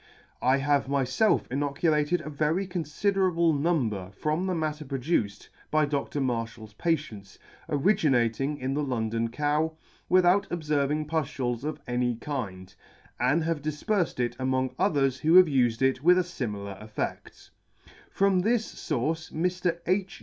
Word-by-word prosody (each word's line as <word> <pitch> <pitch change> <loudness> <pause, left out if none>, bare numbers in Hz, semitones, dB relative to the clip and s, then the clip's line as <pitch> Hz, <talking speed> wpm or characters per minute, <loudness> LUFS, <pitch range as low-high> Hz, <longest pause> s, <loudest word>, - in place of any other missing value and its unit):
I 130 +2 +3
have 140 -1 +1
myfelf 140 - +2
inoculated 150 +4 +1
a 155 - -7
very 155 +6 0
confiderable 180 0 +1
number 130 - 0
from 155 +5 -1
the 185 - 0
matter 155 -2 -2
produced 130 - -2 0.2
by 155 0 +3
Dr. 145 0 -2
Marfhal's 115 -4 -3
patients, 110 - -3 0.3
originating 140 - +2
in 130 0 -2
the 150 - 0
London 115 -4 -1
cow, 150 +5 0 0.4
without 185 +2 +4
obferving 150 -2 0
puftules 130 -6 -2
of 155 +1 -3
any 125 -1 0
kind, 100 -8 -5 0.5
and 160 +3 +2
have 165 -2 -1
difperfed 160 - -1
it 120 -1 0
among 130 0 0
others 140 -9 +2
who 160 +4 +3
have 185 0 +10
ufed 125 -5 +1
it 130 +1 +2
with 180 +4 +6
a - - +4
limilar 105 - -5
effed. 110 0 -6 0.6
From 195 -1 +2
this 225 +4 0
fource 155 +3 -2
Mr. 175 0 -1
H. 185 +1 -1
150 Hz, 135 wpm, -27 LUFS, 125-170 Hz, 0.6 s, have